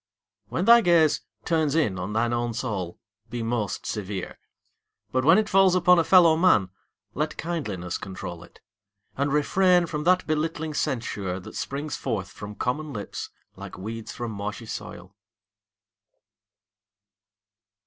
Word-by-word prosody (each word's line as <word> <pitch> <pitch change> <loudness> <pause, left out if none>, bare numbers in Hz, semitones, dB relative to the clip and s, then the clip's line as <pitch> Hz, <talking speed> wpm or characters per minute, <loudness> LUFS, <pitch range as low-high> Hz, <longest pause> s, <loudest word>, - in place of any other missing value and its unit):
When - - -2
thy 235 0 +8
gaze 170 -6 +4 0.2
Turns 160 -4 +1
in 110 -13 +1
on 95 +3 -4
thine 115 +2 +1
own 120 -1 -1
soul, 100 -8 -3 0.3
be 120 -1 -4
most 115 -4 -2
severe. 100 -3 -5 0.7
But 130 0 +1
when 165 +7 +6
it 215 -1 +2
falls 195 -2 +4
upon 180 0 +5
a - - +3
fellow 170 -2 +6
man 135 - +3 0.4
Let 150 +2 -2
kindliness 105 - -3
control 90 -3 -7
it; - - -19 0.5
and 140 +1 0
refrain 180 +4 +3
From 150 -2 -4
that 185 +1 +3
belittling 155 0 -2
censure 110 -11 -2
that - - -11
springs 145 +2 -4
forth 105 -7 -3
From 105 0 -9
common 150 +7 -2
lips 105 -6 -6 0.3
like - - -9
weeds 110 +3 -6
from 120 -2 -5
marshy 105 +2 -5
soil. 100 -3 -8
130 Hz, 140 wpm, -25 LUFS, 105-160 Hz, 0.7 s, thy